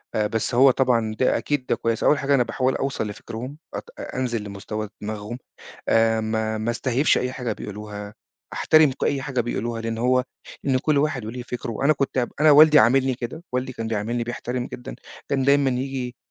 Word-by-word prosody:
لأ، 105 -1 +2
بس 110 +3 -2
هو 135 +1 +7
طبعًا 115 -4 +1
ده 130 - +3
أكيد 145 -3 -2
ده - - +1
كويس. 115 -1 -1
أوّل 150 - +4
حاجة، 140 0 +2
أنا 125 - +4
باحاول 130 +2 0
أوصل 135 -5 -2
لفكرهم، 120 +7 -7 0.2
أت - - -6
أنزل 120 -4 -3
لمستوى 105 +1 -5
دماغهم، 105 +2 -5 0.5
آآ، 115 0 +3
ما 110 0 -1
ما 110 +2 -1
استهيفش 130 +4 +2
أي 125 0 -2
حاجة 125 -3 -3
بيقولوها، 105 0 -7 0.4
أحترم 155 -3 +4
أي 140 -2 0
حاجة 135 -3 -1
بيقولوها، 115 0 -3
لأن 115 0 -3
هو 125 +1 +2 0.4
لأن 130 -2 +2
كل 145 +2 +1
واحد 140 -6 0
وليه 120 +2 -5
فكره. 120 -1 -4
أنا 155 - +6
كنت 135 -3 -1
أنا 155 0 +6
والدي 150 +1 +8
عاملني 130 +4 +4
كده، 125 +7 -6
والدي 125 +1 -2
كان 115 -1 -5
بيعاملني، 115 +2 -2
بيحترم 125 +1 -4
جدًا. 125 - -8 0.3
كان 135 -1 +1
دايمًا 140 -1 +4
ييجي 125 -1 -3
125 Hz, 185 wpm, -23 LUFS, 110-135 Hz, 0.5 s, والدي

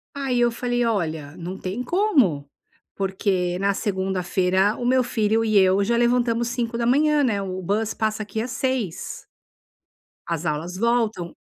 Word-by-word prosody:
Aí 270 -3 -1
eu 240 0 +3
falei: 245 0 -1
"Olha, 160 -9 -2
não 180 +3 -6
tem 195 +7 -4
como. 250 - +2 0.5
Porque 190 -2 -1
na 200 +1 +2
segunda-feira 190 0 0
o 245 - -4
meu 255 +1 +3
filho 225 -1 +1
e 215 -2 +2
eu 190 +1 +4
já 235 +4 +1
levantamos 235 -1 +2
05:00, 245 +5 +1
né, 210 -6 +1
o 185 -1 -4
bus 215 +4 -1
passa 215 0 -1
aqui 220 +1 -4
às 240 +2 -4
06:00. 250 -8 -3 1.0
As 170 0 -2
aulas 165 +4 -3
voltam. 225 -5 0
215 Hz, 145 wpm, -23 LUFS, 185-240 Hz, 1.0 s, eu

